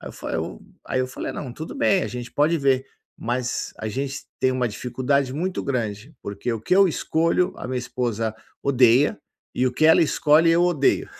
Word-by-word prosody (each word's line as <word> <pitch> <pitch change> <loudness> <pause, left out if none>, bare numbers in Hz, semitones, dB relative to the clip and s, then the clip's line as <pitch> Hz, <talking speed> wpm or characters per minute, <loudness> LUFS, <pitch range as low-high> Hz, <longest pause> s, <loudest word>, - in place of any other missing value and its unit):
Aí - - -8
eu - - -9
fa - - -7
eu - - -3 0.3
aí 130 - 0
eu 130 - 0
falei: 130 - -5
"Não, 130 -4 -6
tudo 160 +6 -7
bem, 195 -9 +3
a - - -1
gente 120 0 -7
pode 155 +3 +2
ver". 135 -2 +2 0.4
Mas 125 +1 -2
a 110 - -5
gente 135 +5 -3 0.2
tem 130 - +3
uma 130 -1 0
dificuldade 130 +4 -1
muito 180 +5 -2
grande, 120 0 -3
porque 100 +4 -4
o 115 - -2
que 180 - +1
eu 195 -1 +6
escolho, 170 +3 +1
a - - -6
minha 130 - -1
esposa 115 -3 -2 0.3
odeia, 130 0 +4 0.4
e 130 - +1
o 125 - 0
que 155 - 0
ela 160 - +6
escolhe, 155 +1 +4
eu 170 +1 +4
odeio. 165 -6 +2
130 Hz, 205 wpm, -23 LUFS, 125-155 Hz, 0.4 s, eu